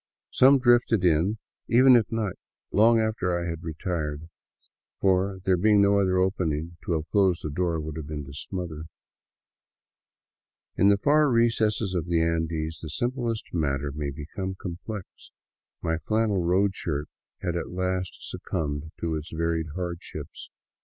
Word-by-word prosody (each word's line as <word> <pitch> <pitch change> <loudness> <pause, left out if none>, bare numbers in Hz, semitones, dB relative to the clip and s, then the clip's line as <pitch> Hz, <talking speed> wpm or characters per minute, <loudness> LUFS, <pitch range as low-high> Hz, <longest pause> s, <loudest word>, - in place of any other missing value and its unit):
Some 135 +2 +6
drifted 120 -5 +3
in 90 +6 +2 0.3
even 130 +2 +7
at 115 -3 +2
night, 110 -4 -2 0.3
long 115 +3 +5
after 110 -6 0
I 85 - -3
had 85 -1 -4
retired, 80 -2 -4 0.7
for, 95 0 +2
there 95 -1 +3
being 105 +3 +4
no 100 0 +4
other 95 -2 +2
opening, 85 -4 0
to 85 - 0
have 80 0 -2
closed 95 -4 +3
the 75 - -3
door 85 +1 0
would 80 0 -5
have 75 -2 -6
been 75 -2 -5
to 70 - -11
smother. 80 0 -5 1.9
In 100 - +4
the 100 0 +5
far 150 +7 +4
recesses 115 -4 +2
of 90 -2 -2
the 85 -1 +2
Andes 80 -1 -1
the 80 - -6
simplest 120 - -2
matter 70 -4 -1
may 75 0 -3
become 80 +7 -5
complex. 95 +3 -6 0.8
My 80 0 0
flannel 110 -1 +1
road 95 +3 +2
shirt 75 -5 -3 0.4
had 90 -2 -1
at 85 - -3
last 90 0 -2
succumbed 75 0 -4
to 85 -1 -1
its 75 +1 -5
varied 80 0 -1
hardships. 85 -2 -6
90 Hz, 150 wpm, -26 LUFS, 80-100 Hz, 1.9 s, even